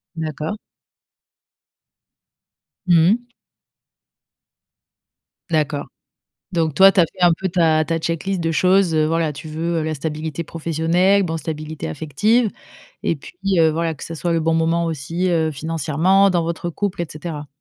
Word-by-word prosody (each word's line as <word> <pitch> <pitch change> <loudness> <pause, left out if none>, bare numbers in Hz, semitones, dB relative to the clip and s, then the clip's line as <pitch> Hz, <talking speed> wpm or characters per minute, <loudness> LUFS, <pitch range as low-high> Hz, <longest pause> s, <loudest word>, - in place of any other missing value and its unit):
D'accord. 155 +4 -4 2.3
Mmh 170 -1 +5
mh. 240 +2 -1 2.2
D'accord. 150 -3 0 0.7
Donc 165 -4 0
toi, 195 +4 +7
tu 195 - +4
as - - +6
fait 185 - -8
un 175 - +6
peu 190 - -1
ta 165 -3 +3
ta 165 -1 0
checklist 170 +4 -2
de 165 -1 0
choses, 185 0 +3
heu, 155 -1 +3
voilà 165 -1 0
tu 150 +3 -9
veux, 165 +2 -2
heu, - - -1
la 155 0 -2
stabilité 155 +2 -4
professionnelle, 165 +5 +1
bon, 165 -3 -2
stabilité 155 - -5
affective 205 - +1 0.5
et 165 - 0
puis, 140 - -13 0.3
heu, 160 -1 +5
voilà 165 +1 -1
que - - -9
ça 165 - -6
soit 170 +2 -2
le 165 - +1
bon 165 +1 +1
moment 165 +1 +1
aussi, 165 +3 -2
heu, 160 -2 +1
financièrement, 165 +5 +2
dans 175 -3 +1
votre 170 +1 -3
couple 195 +1 -3
et 170 - -1
cetera. 155 -1 -6
165 Hz, 155 wpm, -20 LUFS, 155-175 Hz, 2.3 s, toi